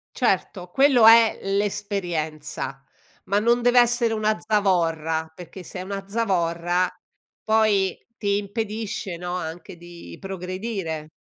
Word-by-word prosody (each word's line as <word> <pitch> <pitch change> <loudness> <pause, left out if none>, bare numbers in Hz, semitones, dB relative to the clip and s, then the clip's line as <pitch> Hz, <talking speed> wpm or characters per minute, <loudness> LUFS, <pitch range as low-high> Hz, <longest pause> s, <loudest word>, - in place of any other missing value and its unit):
Certo, 180 -3 0
quello 265 -1 +5
è 225 0 +7
l'esperienza, 180 -9 -3 0.4
ma 200 +1 +1
non 235 +2 +2
deve 245 0 +4
essere 240 -1 +3
una 215 0 +1
zavorra, 165 -6 0
perché 180 +2 -11
se 180 - -9
è - - -4
una 195 0 -6
zavorra 180 -4 0 0.6
poi 215 -4 +2 0.2
ti 200 -1 0
impedisce, 210 -2 -4
no, 175 +1 -5
anche 170 +1 -7
di 175 0 -12
progredire. 185 -4 -5
195 Hz, 115 wpm, -24 LUFS, 175-215 Hz, 0.6 s, è